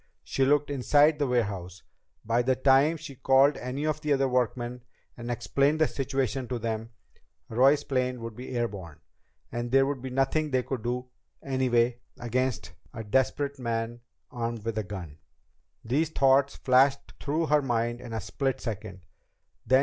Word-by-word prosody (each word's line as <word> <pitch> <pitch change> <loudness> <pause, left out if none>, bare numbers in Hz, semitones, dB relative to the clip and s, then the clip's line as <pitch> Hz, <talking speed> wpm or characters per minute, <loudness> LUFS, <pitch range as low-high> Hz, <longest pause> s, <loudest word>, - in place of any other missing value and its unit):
She 135 - 0
looked 145 +1 +2
inside 145 +3 +3
the 145 - +1
warehouse. 100 -7 -2 0.4
By 115 +2 +2
the 130 +1 +2
time 135 +5 +4
she 155 -2 -9
called 135 +2 +4
any 130 +4 -4
of 155 0 -1
the 150 -2 +1
other 135 -1 +2
workmen 125 -1 -1 0.3
and 120 0 -7
explained 140 +5 +1
the 155 - +4
situation 135 -2 -2
to 125 - -2
them, 115 0 -3 0.6
Roy's 135 +5 +4
plane 130 -2 -1
would 115 -1 -6
be 125 +3 -8
air 120 0 +1
borne. 90 -8 -10 0.5
And 120 0 -3
there 135 +2 +4
would 140 -2 -3
be 130 - -5
nothing 135 +4 +1
they 130 -2 +1
could 130 -2 -4
do, 125 +2 -3 0.3
anyway, 125 -3 +1 0.2
against 120 -5 -2 0.2
a 115 - -5
desperate 135 +5 0
man 115 -1 -3 0.3
armed 115 -2 -4
with 115 -1 -1
a - - -2
gun. 90 -7 -8 0.7
These 145 +7 +1
thoughts 135 -2 +3
flashed 135 +1 +2
through 155 +3 -1
her 150 -1 +3
mind 120 -2 -1
in 120 - -9
a 110 -1 -3
split 135 +4 -2
second. 105 -4 -6
125 Hz, 165 wpm, -28 LUFS, 115-140 Hz, 0.7 s, time